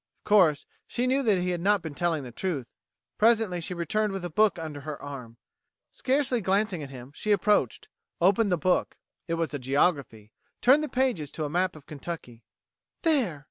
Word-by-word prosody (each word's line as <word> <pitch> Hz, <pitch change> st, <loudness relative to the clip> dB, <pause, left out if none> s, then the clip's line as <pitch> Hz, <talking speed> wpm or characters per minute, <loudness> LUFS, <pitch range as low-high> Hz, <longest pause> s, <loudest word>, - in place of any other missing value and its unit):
Of -, -, -16 dB
course 180 Hz, -8 st, +4 dB, 0.2 s
she 245 Hz, -, -1 dB
knew 265 Hz, +2 st, +2 dB
that 215 Hz, -7 st, +3 dB
he 180 Hz, 0 st, -1 dB
had 175 Hz, -1 st, -2 dB
not 205 Hz, 0 st, +2 dB
been 160 Hz, -3 st, -6 dB
telling 165 Hz, -2 st, -1 dB
the 125 Hz, -, -8 dB
truth. 140 Hz, -3 st, -4 dB, 0.5 s
Presently 220 Hz, -5 st, +3 dB
she 180 Hz, +2 st, -4 dB
returned 210 Hz, +4 st, -1 dB
with 190 Hz, -2 st, -4 dB
a 175 Hz, -, -5 dB
book 215 Hz, +5 st, +3 dB
under 155 Hz, -3 st, -6 dB
her 150 Hz, 0 st, -6 dB
arm. 125 Hz, -5 st, -8 dB, 0.5 s
Scarcely 260 Hz, -2 st, 0 dB
glancing 195 Hz, -2 st, +1 dB
at 140 Hz, -, -7 dB
him, 130 Hz, 0 st, -10 dB
she 215 Hz, -, -2 dB
approached, 205 Hz, -, +2 dB, 0.3 s
opened 195 Hz, +3 st, +3 dB
the 180 Hz, -, +3 dB
book 180 Hz, +4 st, 0 dB, 0.3 s
it 165 Hz, -, -1 dB
was 165 Hz, -2 st, -2 dB
a 145 Hz, -, -3 dB
geography 135 Hz, -5 st, 0 dB, 0.3 s
turned 270 Hz, +5 st, +5 dB
the 305 Hz, -, -3 dB
pages 245 Hz, -, 0 dB
to 155 Hz, -, -3 dB
a 145 Hz, -, -4 dB
map 180 Hz, +1 st, +1 dB
of 150 Hz, -2 st, -14 dB
Kentucky. 140 Hz, -6 st, -8 dB, 0.6 s
"There!" 260 Hz, -, +2 dB
175 Hz, 190 wpm, -27 LUFS, 145-210 Hz, 0.6 s, turned